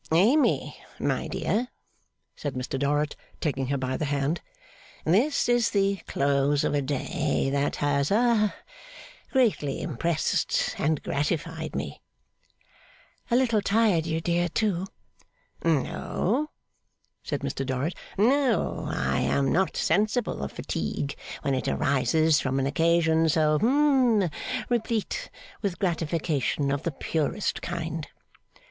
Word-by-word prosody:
'Amy, 225 - +3 0.2
my - - -1
dear,' 240 +3 -1 0.7
said 145 -3 -4
Mr 130 +1 -3
Dorrit, 145 +2 0 0.2
taking 135 -4 -1
her 140 +1 0
by 130 0 -2
the 155 - -1
hand, 145 +3 -1 0.6
'this 230 - +3
is 240 -2 +3
the 200 -1 +1
close 140 +1 +2
of - - 0
a 145 - +2
day, 135 0 -1
that 140 +1 0
has 140 -1 +1
ha 215 -1 +3 0.8
greatly 215 - +1
impressed 160 +2 0
and 155 0 0
gratified 160 +2 -2
me.' - - -4 1.3
'A 235 - +2
little 235 -4 +3
tired 200 -5 +2
you, 160 0 0
dear, 175 +1 0
too?' 190 -1 0 0.8
'No,' 185 - 0 0.7
said - - -3
Mr 135 - -2
Dorrit, 135 +5 -1 0.2
'no: 255 +3 +2
I 70 +2 0
am 135 -1 +1
not 190 +2 +1
sensible 215 - +1
of 70 - -4
fatigue 110 - -3 0.3
when 140 - +1
it 130 - -1
arises 155 +3 +2
from 130 0 -1
an 135 - +1
occasion 165 +1 +3
so 155 -1 +3
hum 255 - +3 0.4
replete 240 - -1 0.3
with 195 -5 -2
gratification 160 - 0
of 140 0 -1
the 170 - -2
purest 160 +6 -2
kind. 165 -2 -4
160 Hz, 120 wpm, -27 LUFS, 140-210 Hz, 1.3 s, Amy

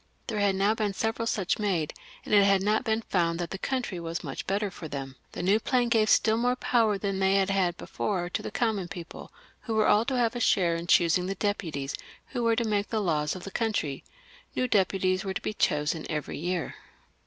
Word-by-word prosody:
There 220 -3 -3
had 200 -1 +2
now 200 +3 +3
been 210 -3 -2
several 225 +2 -1
such 195 -3 0
made, 185 -7 0 0.3
and - - -3
it 205 -1 +7
had 195 -1 +4
not 215 +4 +2
been 225 -1 0
found 170 -4 0
that 175 -1 -4
the 195 - -5
country 250 -9 -2
was 170 +1 -4
much 140 -4 -6
the - - -3
better 200 0 0
for 165 - -8
them. 135 -2 -6 0.2
The - - -4
new 200 +4 +4
plan 245 +1 +1
gave 220 -2 +3
stiU 220 +1 +4
more 245 +1 +2
power 225 -5 +2
than 195 -1 -2
they 190 0 +3
had 195 0 +2
had 185 -3 +1
before 180 -4 -2
to 175 - -3
the - - -5
common 215 -6 -1
people, 170 -1 -9 0.3
who 225 - -4
were 215 -1 +3
all 210 - +5
to 260 0 -1
have 235 -1 +1
a - - -2
share 175 -7 +3
in 170 +1 -5
choosing 175 +1 +4
the 195 - -2
deputies 160 -9 -2 0.4
who 245 - -3
were 230 -1 +3
to 235 - +1
make 205 -2 0
the 220 - 0
laws 155 -6 0
of 180 - -8
the 195 - -7
country. 195 - -1 0.5
These 255 -1 0
deputies 190 -2 +2
were 190 -1 -4
to - - -2
be - - -2
chosen 150 -3 0
new - - -8
every 150 - -4
year. 175 +1 -2
195 Hz, 235 wpm, -28 LUFS, 175-220 Hz, 0.5 s, it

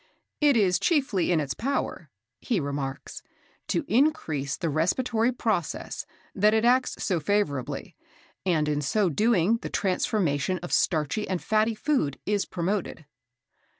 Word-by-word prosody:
"It 290 -4 +4
is 180 -4 +3
chiefly 230 - +1
in 170 - +3
its 140 -3 -2
power," 275 +4 -3 0.3
he 230 -7 -1
remarks, 140 -2 -4 0.5
"to 310 - -1
increase 215 - +1
the 170 - -2
respiratory 225 - +1
process 220 -9 -2 0.3
that 210 +2 +3
it 220 +1 +2
acts 255 +1 +3
so 180 -4 +1
favourably, 150 -6 -1 0.5
and 160 -5 +1
in 150 -1 0
so 190 +7 +1
doing 215 +3 +3
the - - -7
transformation 185 -4 0
of 175 - -5
starchy 160 +6 +1
and 185 -2 -1
fatty 215 +3 +1
food 215 - 0
is 205 -1 0
promoted." 180 -2 -3
195 Hz, 135 wpm, -26 LUFS, 155-230 Hz, 0.5 s, It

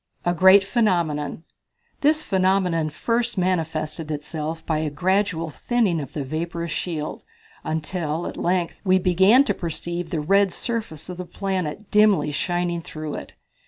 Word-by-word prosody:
A 175 - +2
Great 190 +3 +7
Phenomenon. 170 -9 0 0.6
This 310 +2 +3
phenomenon 185 -4 +1
first 230 +9 -1
manifested 160 -3 -1
itself 155 +2 -4
by 155 -2 0
a 155 -1 -1
gradual 180 +1 0
thinning 215 - 0
of 135 - -8
the 145 - -3
vaporous 170 +4 -4
shield, 155 -2 -4 0.4
until, 160 +1 -2
at - - -5
length, 175 -1 -1
we 185 -2 +4
began 190 +7 +5
to - - 0
perceive 170 0 -4
the 165 - -2
red 195 +5 +3
surface 215 - -4
of 180 -1 -7
the 180 - -5
planet 190 +1 -4
dimly 210 -7 +4
shining 175 +2 -1
through 155 -2 -6
it. - - -8
175 Hz, 145 wpm, -23 LUFS, 155-190 Hz, 0.6 s, Great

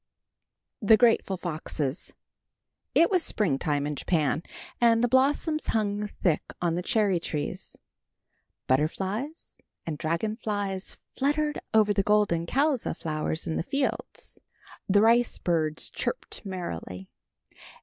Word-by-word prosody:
THE 215 +1 +6
GRATEFUL 225 -4 +3
FOXES. 155 -4 -3 0.8
It 335 - +5
was 370 -3 +4
springtime 145 - 0
in 150 0 -2
Japan, 155 -1 0 0.4
and 230 0 +5
the - - +4
blossoms 285 +5 +2
hung 210 -1 0
thick 175 -6 0 0.2
on 170 -2 0
the 175 - -1
cherry 200 -2 +2
trees. 150 -3 -4 0.9
Butterflies 190 - -2 0.3
and 150 -2 -4
dragon 170 +8 -1
flies 205 -4 -3 0.2
fluttered 295 +2 0
over 215 -1 +4
the 200 - +2
golden 195 -5 +2
colza 275 - +1
flowers 155 0 -3
in 160 - -2
the - - 0
fields. 275 - -3 0.5
The 205 +1 +5
rice 235 +2 +4
birds 160 -3 0
chirped - - -4
merrily. 95 - -6
200 Hz, 120 wpm, -27 LUFS, 160-230 Hz, 0.9 s, THE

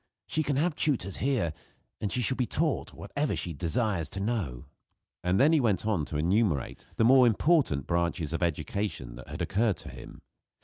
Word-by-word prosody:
She 155 - 0
can 145 -2 0
have 155 +3 +1
tutors 120 - 0
here; 125 - 0 0.5
and 105 - -2
she 125 - 0
shall 130 - +1
be 125 -2 -1
taught 155 -2 0
whatever 145 +1 -2
she 85 - -3
desires 85 - -1
to 100 - -5
know." 95 - -2 0.6
And 90 +2 +2
he 140 - +6
then 160 -2 +4
went 105 -5 +1
on 100 -9 +1
to 75 - -4
enumerate 85 - 0
the 115 - +3
more 130 0 +7
important 120 - +2
branches 85 -2 -1
of 80 - -2
education 80 - -2
that - - -11
had - - -4
occurred 105 -2 +1
to - - -8
him. - - -11
105 Hz, 185 wpm, -29 LUFS, 85-130 Hz, 0.6 s, more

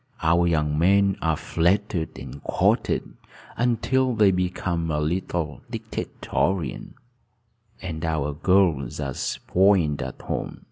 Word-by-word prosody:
Our 85 +2 +4
young 75 -2 +1
men 100 +2 +4
are 80 -2 +1
flattered 85 0 0
and 70 +1 -9
courted - - 0 0.4
until 125 +1 +1
they 105 -3 +5
become 90 -2 -1
a 75 -1 0
little 80 -3 -2
dictatorial, 90 -8 -2 1.0
and 80 -4 -5
our 75 -3 -1
girls 85 -5 +2
are 70 -1 -3
spoiled 90 -2 +1
at 65 -2 -7
home. - - -4
85 Hz, 110 wpm, -24 LUFS, 75-95 Hz, 1.0 s, they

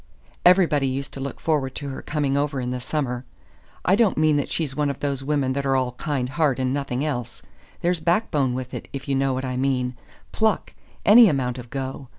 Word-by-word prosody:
Everybody 175 -6 +5
used 135 +1 -3
to - - -7
look 135 0 -5
forward 140 -5 0
to 145 -1 -5
her 130 - -6
coming 145 -3 -1
over 140 -1 0
in 125 0 -2
the 125 - -3
summer. 125 -2 -2 0.6
I 185 - +5
don't 215 -3 +3
mean 155 -1 +4
that 145 - -1
she's 150 -5 -2
one 150 0 +1
of 140 - -4
those 140 -2 -2
women 140 -2 0
that 140 +1 -2
are 135 -1 +1
all 130 -1 +1
kind 130 0 -2
heart 135 0 +1
and 130 -1 0
nothing 140 -1 -2
else. 125 -5 -4 0.4
There's 175 0 +1
backbone 155 - +1
with 130 0 -5
it, - - -6
if 135 0 -6
you 140 - 0
know 135 -1 +1
what 130 +1 -3
I 125 -1 -3
mean 130 -1 0 0.4
pluck 220 -1 0 0.3
any 220 +1 +9
amount 130 -4 -1
of 120 -1 -10
go. 135 0 -5
135 Hz, 215 wpm, -24 LUFS, 130-150 Hz, 0.6 s, any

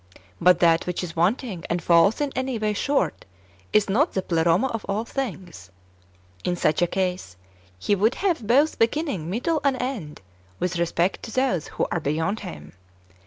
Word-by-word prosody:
But 180 -1 +5
that 165 0 +4
which 180 0 -2
is 170 -2 -6
wanting, 185 +1 0
and 175 - 0
falls 170 - +4
in 290 -1 0
any 260 -2 -1
way 215 -1 0
short, 280 +7 0 0.5
is 215 - +3
not 250 - +2
the 190 - -1
Pleroma 170 +5 +2
of 225 -3 -4
all 210 +3 -1
things. 190 - -6 0.7
In 180 - 0
such 155 -1 +1
a 175 - +4
case. 180 - -3 0.4
He 205 - +1
w^ould 215 +5 +2
have 340 - -1
both 280 +7 +3
beginning, 230 - 0
middle, 275 - 0
and 270 -3 +1
end, 220 - -4 0.4
with 180 -1 -1
respect 170 +2 0
to 225 - -8
those 255 - 0
who - - +2
are 175 - 0
beyond 160 +8 -1
Him. 75 -1 -9
195 Hz, 170 wpm, -24 LUFS, 170-250 Hz, 0.7 s, But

